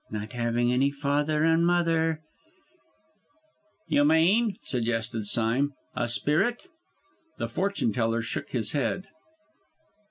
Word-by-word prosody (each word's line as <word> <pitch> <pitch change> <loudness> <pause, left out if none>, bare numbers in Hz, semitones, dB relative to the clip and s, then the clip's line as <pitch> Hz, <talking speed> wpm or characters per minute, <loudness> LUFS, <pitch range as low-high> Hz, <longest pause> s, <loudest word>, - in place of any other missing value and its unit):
not 105 +2 -6
having 120 0 0
any 135 +3 +3
father 145 +2 0
and 165 +1 +3
mother 165 -2 +2 0.8
" 315 -5 -41
"You 145 -3 +3
mean," 180 +8 +3
suggested 115 -3 -2
Sime, 120 +7 +1 0.2
"a 120 -1 -1
spirit?" 155 - +1 0.7
The - - -2
fortune 195 - -1
teller 115 +1 0
shook - - -4
his 110 -5 -2
head. 170 +7 -1
145 Hz, 115 wpm, -27 LUFS, 120-170 Hz, 0.8 s, any